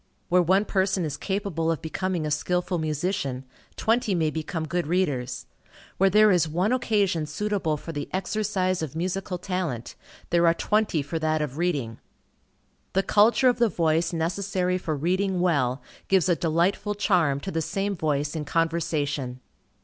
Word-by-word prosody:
Where 180 0 +5
one 190 +4 +3
person 190 -3 +1
is 150 -2 -3
capable 190 -4 -1
of 165 - -2
becoming 175 0 -2
a 150 - -2
skilful 180 +3 0
musician, 150 -4 -2 0.3
twenty 225 -3 +1
may 160 -3 +1
become 160 +1 -3
good 175 +1 -1
readers. 145 -8 -1 0.5
Where 195 +1 +5
there 210 +2 +6
is 170 -3 +2
one 180 +9 +1
occasion 200 -10 +1
suitable 185 -1 -1
for 165 - -7
the 145 -2 -5
exercise 190 -2 -1
of 155 -2 -5
musical 185 +2 -2
talent, 180 - -3 0.4
there 170 0 +4
are 165 - +4
twenty 210 -6 +1
for 160 +3 -3
that 155 -1 +1
of 145 +1 -5
reading. 140 -11 -1 0.9
The 195 - +2
culture 225 +7 +4
of 245 -1 +3
the 235 -2 +4
voice 165 -1 +1
necessary 180 +2 -1
for 160 -4 -2
reading 185 +5 0
well, 135 -8 +1 0.2
gives 190 -3 +3
a 175 - +3
delightful 175 +6 0
charm 175 -9 +2
to 190 - -5
the 165 - -1
same 195 +4 -2
voice 150 -2 -1
in 155 - -2
conversation. 150 -5 -1
175 Hz, 160 wpm, -25 LUFS, 155-190 Hz, 0.9 s, there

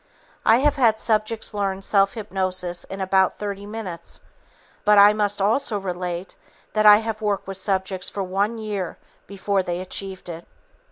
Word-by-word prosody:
I 225 - +7
have 290 0 +2
had 230 -5 +4
subjects 220 0 0
learn 195 -2 -2
self 195 +1 +2
hypnosis 185 -4 -3
in 195 - -8
about 190 0 +2
30 200 -1 -5
minutes, 195 -6 -5 0.6
but 210 0 +5
I 205 +1 +8
must 205 -1 -1
also 215 +2 +1
relate 180 -1 -4 0.4
that 215 -1 +4
I 210 0 +10
have 220 0 -4
worked 205 -2 -1
with 195 -1 -2
subjects 190 -1 -1
for 200 - -3
one 200 +5 -1
year 210 -5 -4 0.3
before 200 0 -1
they 175 -1 -3
achieved 190 0 -5
it. 170 -1 -8
200 Hz, 160 wpm, -23 LUFS, 190-210 Hz, 0.6 s, I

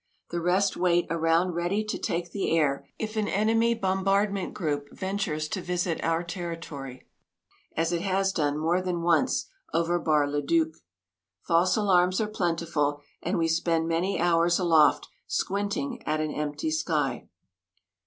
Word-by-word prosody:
The 170 0 -2
rest 185 +3 +2
wait 175 -1 +2
around 165 +2 +2
ready 175 +5 0
to 215 - -3
take 170 0 -2
the 190 -4 0
air 140 -3 +1
if 215 0 -4
an 210 -1 +1
enemy 225 +3 +2
bombardment 195 0 0
group 145 -5 -3
ventures 190 -6 -2
to 185 - -3
visit 175 -1 -2
our 165 +1 +1
territory 165 -7 -7 0.7
as 165 +1 +1
it 170 -1 0
has 195 0 +1
done 150 -4 0
more 165 +4 +1
than 180 -2 -2
once 175 +10 +2 0.3
over 170 +1 +1
Bar 150 -3 +2
le 145 +1 -1
Duc. 160 +2 +2 0.7
False 175 +4 +3
alarms 185 -3 +3
are 220 - +1
plentiful, 165 -7 -1 0.2
and 180 +4 -1
we 165 -1 +2
spend 165 0 +1
many 170 +4 0
hours 170 0 +3
aloft 165 -4 +4 0.2
squinting 205 +6 -2
at 155 0 +1
an 155 -1 -1
empty 150 +1 -2
sky. 155 -5 -1
170 Hz, 150 wpm, -27 LUFS, 160-190 Hz, 0.7 s, aloft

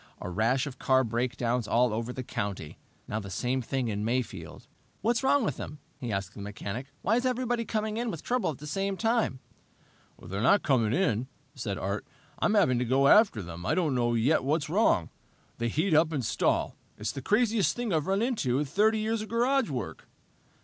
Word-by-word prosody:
A 90 - -5
rash 115 +8 +1
of 130 -3 -8
car 130 0 +3
breakdowns 120 0 -1
all 120 -1 +3
over 115 +2 -2
the 130 +1 -5
country. 100 -9 -5 0.3
Now, 105 - -2
the 100 -2 -7
same 125 +6 -1
thing 130 +1 -2
in 105 -1 -2
Mayfield! 120 +2 -3 0.4
"What's 235 +3 +1
wrong 275 0 +3
with 145 - -2
them?" 150 - -7 0.2
he 120 -3 -4
asked 100 0 -3
the 100 - -9
mechanic. 105 +5 -5 0.2
"Why 220 +5 +3
is 245 - -1
everybody 245 -2 -1
coming 215 0 -2
in 240 0 -1
with 165 -7 -6
trouble 250 -5 0
at 150 - -4
the 150 - -10
same 195 +5 -2
time?" 225 - +1 0.8
"They're 95 +3 -5
not 200 - +4
coming 115 -6 +2
in," 130 - +1 0.3
said 110 -7 -4
Art. 100 +2 -2 0.4
"I'm 215 - +2
having 145 - +4
to - - +1
go 135 +3 +3
out 140 - +9
after 190 - 0
them. 85 0 -8
I - - +1
don't 165 -6 +1
know 120 -1 +1
yet 130 +8 +3
what's 150 +2 0
wrong. 175 - +2 0.5
They 120 - 0
heat 160 - +1
up 155 +1 +4
and 140 -6 -2
stall. - - +1 0.2
It's 105 - -2
the 135 - -6
craziest 215 - +2
thing 240 -5 -2
I've 155 +1 0
run 195 +3 +1
into 210 - 0
in 150 - 0
30 215 +9 +2
years 220 +1 -1
of 215 - -7
garage 250 +1 +2
work." 125 -8 -5
135 Hz, 205 wpm, -29 LUFS, -, 0.8 s, out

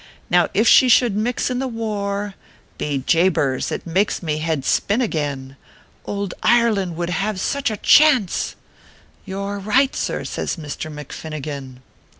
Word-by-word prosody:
Now 175 -1 +4
if 220 +3 +3
she 255 - +7
should 230 -2 +4
mix 235 +4 -1
m 250 - -1
tho 265 - -1
war 205 -3 -3 0.5
Bo 145 -2 -1
jabers! 165 -6 +2
it - - -4
makes 190 +4 0
mo 155 -3 -1
head 155 -4 -2
spin 205 +4 +1
again 145 - -3 0.5
I - - -6
Ould 200 -2 -3
Ireland 215 -7 +2
would 175 +1 -3
have 195 +2 -1
such 280 +6 -1
a 215 - -4
chance 270 - +4 0.3
/" - - -26
" - - -32
You 195 +1 -4
re 200 0 -4
right, 255 +7 +2
sir," - - -2
says - - -3
Misther 155 0 -6
McFinnigan. 145 -3 -7
195 Hz, 160 wpm, -21 LUFS, 155-220 Hz, 0.5 s, she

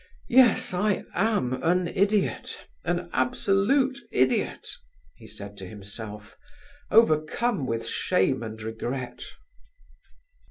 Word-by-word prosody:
Yes, 250 -2 +5
I 200 +2 +1
am 200 - +1
an 180 +1 +2
idiot, 200 +2 0 0.2
an - - -2
absolute 260 +8 +2
idiot!" 130 0 +1 0.5
he 110 - -15
said 100 -1 -9
to 95 - -7
himself, 105 +1 -9 0.5
overcome 195 - +3
with 115 -1 -2
shame 130 +7 +1
and 110 -1 -6
regret. 120 +3 -5
155 Hz, 95 wpm, -26 LUFS, -, 0.5 s, Yes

